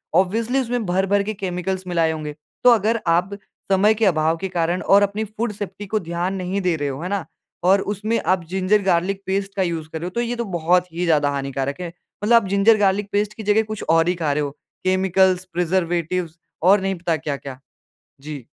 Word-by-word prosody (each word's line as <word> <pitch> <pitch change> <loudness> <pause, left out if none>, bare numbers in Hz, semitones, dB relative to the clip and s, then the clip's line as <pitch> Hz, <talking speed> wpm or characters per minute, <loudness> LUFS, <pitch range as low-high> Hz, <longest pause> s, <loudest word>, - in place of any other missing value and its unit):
Obviously 225 +7 +2
उसमें 245 -2 -2
भर-भर 195 +2 +1
के 215 +2 -3
chemicals 190 -1 -3
मिलाए 165 -2 +1
होंगे। 155 -2 -5 0.3
तो - - +9
अगर 225 0 +2
आप 180 +4 +1 0.3
समय 200 +3 +5
के 220 +1 +1
अभाव 160 -3 +2
के 190 - -3
कारण 175 0 0
और 200 +1 +5
अपनी 205 +2 -1
फूड 220 +2 -3
सेफ्टी 200 0 -6
को 215 +2 0
ध्यान 170 +1 -3
नहीं 190 +1 -2
दे 180 -3 +1
रहे 145 -1 -2
हो, 135 +2 -5
है 180 - -4
ना? 200 -3 -2 0.4
और 190 +2 +4
उसमें 210 +3 -1
आप 185 -1 +2
जिंजर 190 +3 +2
गार्लिक 190 +1 +1
पेस्ट 195 +1 -2
का 195 - +1
यूज़ 165 -3 -3
कर 160 - -5
रहे 170 - -5
हो - - -6
तो 235 - +1
ये 240 0 -2
तो 235 - -2
बहुत 180 -1 +1
ही 175 +2 -1
ज़्यादा 150 -4 +3
हानिकारक 140 +1 -3
है। 180 - -3 0.4
मतलब 230 +3 +5
आप - - -5
जिंजर 200 +3 +5
गार्लिक 200 0 +1
पेस्ट 205 +1 0
की 220 - -6
जगह 210 +2 +3
कुछ 215 - -4
और 165 0 +4
ही 180 - +1
खा 160 -4 0
रहे 150 +1 0
हो। 145 - -3 0.3
केमिकल्स, 185 0 +2
प्रिजर्वेटिव्स 175 -1 -1 0.3
और 190 +3 +5
नहीं 195 0 -1
पता 170 -1 -1
क्या-क्या। 140 -3 -5 0.6
जी। 145 -4 -8
185 Hz, 215 wpm, -21 LUFS, 170-200 Hz, 0.6 s, तो